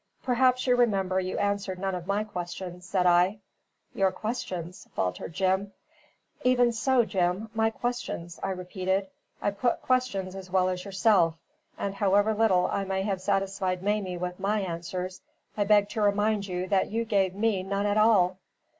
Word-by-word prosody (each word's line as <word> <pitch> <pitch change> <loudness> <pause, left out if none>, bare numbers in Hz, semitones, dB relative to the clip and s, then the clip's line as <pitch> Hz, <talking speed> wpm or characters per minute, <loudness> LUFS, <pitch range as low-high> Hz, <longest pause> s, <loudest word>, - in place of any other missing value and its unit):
"Perhaps 255 0 +2
you 250 -1 +4
remember 195 -6 +2
you 185 0 -3
answered 200 -2 -1
none 190 +1 -2
of 180 -1 -5
my 200 +2 +1
questions," 180 -2 -6
said 185 -1 +1
I. 180 +3 +4 0.6
"Your 195 -1 +2
questions?" 185 -7 -5
faltered 90 - -2
Jim. 190 +2 0 0.7
"Even 245 -1 +4
so, 240 +1 +2
Jim. 190 +2 -1
My 220 0 +2
questions," 225 -8 -4
I 195 - -2
repeated. 190 +1 -2 0.3
"I 205 - +2
put 235 +4 -1
questions 250 -8 0
as 190 -1 -8
well 185 0 +2
as 180 +1 -4
yourself; 190 -4 +3 0.4
and 200 - -2
however 205 +2 +3
little 205 -4 +3
I 200 - -1
may 190 0 -1
have 195 -2 -2
satisfied 195 -1 -1
Mamie 200 -3 -1
with 180 +1 -4
my 205 +2 0
answers, 180 +1 -4 0.3
I 205 - +1
beg 205 0 +4
to 215 +1 -3
remind 205 0 +2
you 180 0 -3
that 195 -2 +2
you 230 +2 -1
gave 195 -4 +1
me 210 -2 +1
none 200 +2 -2
at 205 0 +1
all." 190 -4 +4
195 Hz, 165 wpm, -27 LUFS, 185-215 Hz, 0.7 s, you